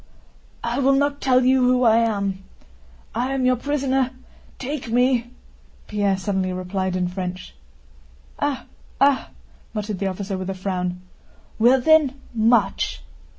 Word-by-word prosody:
"I 235 +3 -1
will 275 0 +4
not 285 +1 0
tell 255 -1 +3
you 260 0 +4
who 250 0 +3
I 225 -1 +5
am. 200 -4 0 0.7
I 250 +4 -1
am 260 -1 0
your 255 0 +4
prisoner—take 265 0 -3
me!" 245 0 +2 0.6
Pierre 200 -2 0
suddenly 190 -1 -1
replied 185 0 -2
in 180 -1 0
French. 180 0 -5 0.9
"Ah, 285 -2 -1 0.3
ah!" 275 -1 +3 0.5
muttered 210 -2 -3
the 195 - 0
officer 190 0 -4
with 185 0 -4
a 195 - -3
frown. 180 -1 -3 0.6
"Well 245 +4 +5
then, 290 -2 +4
march!" 230 +1 +1
235 Hz, 130 wpm, -22 LUFS, 190-260 Hz, 0.9 s, I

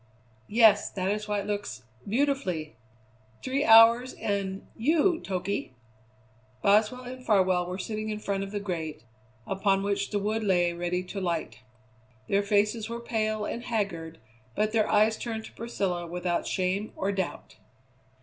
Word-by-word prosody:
"Yes, 215 -2 +5
that 190 -1 -2
is 210 0 -3
why 205 -1 0
it - - -7
looks 205 - -4 0.3
beautifully. 225 - 0 0.7
Three 270 +2 0
hours 230 +2 +7
and 195 -1 -3
you, 320 +7 +2
Toky!" 185 -7 -3 0.9
Boswell 215 +5 +3
and 255 +1 -8
Farwell 185 -5 +2
were 180 +1 -4
sitting 215 +2 -4
in 210 - -2
front 200 -2 -2
of 195 - -6
the 205 0 -3
grate, 165 - -4 0.4
upon 195 0 +1
which 200 0 -1
the 205 - -1
wood 215 +2 -1
lay 175 -3 +2
ready 175 +1 -2
to 195 +2 -6
light. 165 -11 -2 0.7
Their 200 - +2
faces 210 +2 +1
were 235 0 -4
pale 215 -2 -1
and 235 - -4
haggard, 170 -8 -2 0.4
but 215 0 +1
their 220 -1 +2
eyes 215 +1 +4
turned 225 -2 -4
to - - -12
Priscilla 190 -7 -3
without 175 0 -2
shame 190 +3 -1
or 195 - -1
doubt. 190 -3 -4
205 Hz, 150 wpm, -28 LUFS, 185-220 Hz, 0.9 s, hours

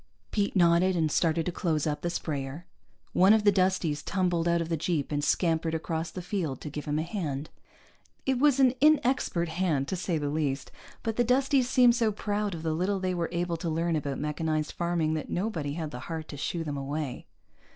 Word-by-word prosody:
Pete 205 -1 0
nodded 175 +1 +4
and 160 -3 +1
started 165 0 +1
to 180 - -1
close 160 -5 -1
up 150 -1 -1
the 175 - -1
sprayer. 145 -1 -4 0.5
One 190 +3 +6
of 220 -1 +3
the 205 - +6
Dusties 185 -6 +1
tumbled 175 -3 0
out 170 0 +3
of 165 - -2
the 165 - 0
jeep 155 -2 -1
and 145 0 -1
scampered 165 0 +1
across 160 0 -2
the 180 +2 -7
field 170 - -2
to 150 - -6
give 150 0 -5
him 150 0 -1
a 155 - 0
hand. 155 -6 -4 0.7
It 265 -2 +1
was 285 -1 +4
an 260 -2 +6
inexpert 265 - +3
hand 160 -5 0
to - - -1
say 175 -2 -1
the 145 -1 -2
least, 145 -3 -2 0.3
but 225 -1 -2
the 240 - +4
Dusties 260 +1 +2
seemed 245 -2 +6
so 230 -2 +2
proud 205 -1 -2
of 160 - -7
the 160 -1 0
little 190 +4 0
they 185 -1 -1
were 170 -2 -1
able 170 -1 -1
to 165 +1 -3
learn 165 +1 0
about 145 -3 -2
mechanized 155 +1 -1
farming 170 -2 0
that 155 - -3
nobody 175 -7 -2
had 160 -1 -4
the 125 - -6
heart 160 +4 -6
to - - -6
shoo 165 +4 -2
them 145 -3 -4
away. 140 0 -4
170 Hz, 215 wpm, -28 LUFS, 155-190 Hz, 0.7 s, One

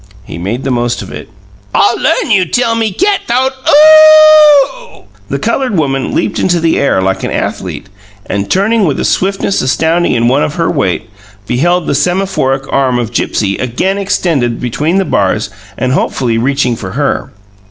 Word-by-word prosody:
He - - -9
made 105 +9 -4
the 135 - -2
most 120 -1 -2
of - - -11
it. - - -9 0.5
"I - - +3
learn 480 - -1
you 195 -3 +3
tell 230 +6 0
me 225 -2 -1
cat 395 - 0
th'owed 255 +3 +1 0.2
OOOOH!" 310 - +5 0.3
The - - -2
coloured 255 -8 -1
woman 135 -4 -1
leaped - - -1
into 175 -2 +1
the 165 0 +1
air 115 -9 +1
like 95 0 -2
an - - -2
athlete, - - -4 0.4
and, 100 0 -3
turning 210 +2 +1
with 145 -5 -1
a - - -1
swiftness 195 +1 -1
astounding 160 +6 0
in 120 -1 +1
one 135 +4 +2
of 150 - -2
her 165 -2 0
weight, 115 - -2 0.4
beheld 170 - 0
the - - -1
semaphoric 175 -5 -1
arm 130 -2 +1
of 120 -1 -4
Gipsy 100 -4 -1
again 180 +11 -2
extended 155 -11 -1
between 150 +9 -1
the 195 - +1
bars 100 - -1 0.3
and 130 - -1
hopefully 125 -3 -1
reaching 125 -1 0
for 95 -4 -8
her. - - -2
160 Hz, 175 wpm, -11 LUFS, -, 0.5 s, OOOOH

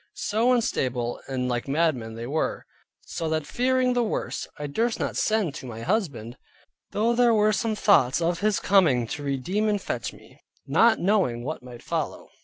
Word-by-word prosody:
So 225 +4 +1
unstable 125 - 0
and 130 -2 -2
like 120 0 -2
madmen 135 -7 0
they 115 +1 -6
were. 150 +5 -2 0.4
So 165 -1 -4
that 155 -1 -1
fearing 255 - +1
the 245 - +2
worst, 225 - -3
I 150 - -5
durst 225 +11 -1
not - - -2
send 215 -8 +1
to 130 - -8
my 115 -1 -7
husband, 140 - -2 0.5
though 225 +3 +1
there 235 -1 +4
were 215 0 +3
some 220 +2 0
thoughts 140 -12 +4
of 170 0 0
his 210 0 +1
coming 160 -12 +3
to 145 - -5
redeem 160 +10 -1
and 205 -1 +1
fetch - - -4
me, - - -18 0.3
not 230 -1 +4
knowing 180 - +1
what 155 +5 -4
might 125 -1 -11
follow. - - -3
170 Hz, 180 wpm, -25 LUFS, -, 0.5 s, there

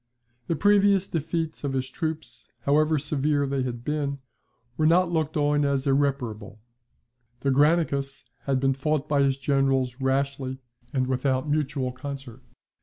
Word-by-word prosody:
The 165 - 0
previous 200 +1 +4
defeats 165 0 -3
of 140 -2 -2
his 130 -1 -1
troops, 155 -4 -5
however 150 +4 +3
severe 145 0 0
they 135 -1 -1
had 120 -2 -4
been, 145 0 -2 0.6
were 155 - +2
not 175 +2 +4
looked 160 -2 -1
on 145 0 +2
as 140 -1 0
irreparable, 125 -7 -1 0.8
The 140 - +1
Granicus 140 -2 +2 0.2
had 135 -2 +1
been 135 0 +2
fought 150 +2 -1
by 145 -2 +2
his 135 -1 +2
generals 135 -2 +1
rashly 135 0 -1 0.3
and 130 -2 0
without 130 +1 0
mutual 145 -3 -1
concert. 130 -2 -8
140 Hz, 140 wpm, -26 LUFS, 130-150 Hz, 0.8 s, previous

